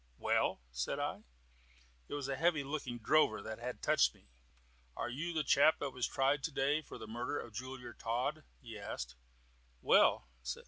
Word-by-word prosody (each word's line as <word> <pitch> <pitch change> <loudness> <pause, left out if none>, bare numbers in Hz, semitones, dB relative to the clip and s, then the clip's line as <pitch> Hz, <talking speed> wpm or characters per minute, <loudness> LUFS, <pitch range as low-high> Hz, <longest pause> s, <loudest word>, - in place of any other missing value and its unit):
"Well?" - - +1
said - - -2
I. - - -3 0.8
It - - -4
was 140 -2 -3
a 135 - -1
heavy 160 0 +2
looking 135 -4 -4
drover 120 0 +3
that 110 0 -6
had 125 +1 -5
touched - - +4
me. - - -24 0.7
"Are 120 - -2
you 155 +7 -3
the 160 -2 0
chap 145 +3 +5
that 140 - -3
was 125 -1 -1
tried 135 +1 +2
to 160 - -2
day 145 +2 +2
for 150 - -10
murder 120 +6 -3
of 115 - -8
Jeweller 130 +3 -6
Todd?" 125 +7 -2 0.2
he 115 -4 -9
asked. 65 -10 -5 0.7
"Well?" 60 - +5
135 Hz, 170 wpm, -35 LUFS, 115-145 Hz, 0.8 s, chap